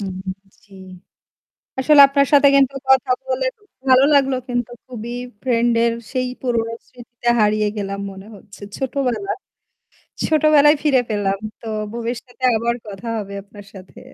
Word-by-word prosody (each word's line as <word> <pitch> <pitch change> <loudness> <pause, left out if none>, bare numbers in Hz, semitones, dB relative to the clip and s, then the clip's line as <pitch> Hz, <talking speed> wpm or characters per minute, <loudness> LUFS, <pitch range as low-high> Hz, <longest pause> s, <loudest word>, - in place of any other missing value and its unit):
হুম। 190 -2 -5 0.5
জ্বি। 200 -3 -19 1.1
আসলে 290 +2 +6
আপনার 280 0 +2
সাথে 285 0 +7
কিন্তু 275 -1 +3 0.2
কথা 265 0 +4
বলে - - -2 0.4
ভালো 260 +1 +6
লাগলো 270 -2 +3
কিন্তু 245 -1 -2
খুবই 240 -2 -7 0.3
ফ্রেন্ড 240 -2 +1
এর 235 0 +2 0.2
সেই 255 -1 -1
পুরনো 230 -3 -1 0.2
স্মৃতিতে 240 -1 -5
হারিয়ে 210 0 +2
গেলাম 200 -1 -4
মনে 195 +1 -12
হচ্ছে। 200 +1 -16 0.2
ছোটবেলা। 270 +7 -2 0.9
ছোটবেলায় 305 -1 +5
ফিরে 275 -5 +3
পেলাম। 195 -2 -1 0.2
তো - - -14 0.3
ভবিষ্যতে 240 +2 -6
আবার 235 +1 -1
কথা 205 +3 -8
হবে 200 -2 -6
আপনার 205 0 -14
সাথে। 190 -2 -13
240 Hz, 135 wpm, -20 LUFS, 215-270 Hz, 1.1 s, সাথে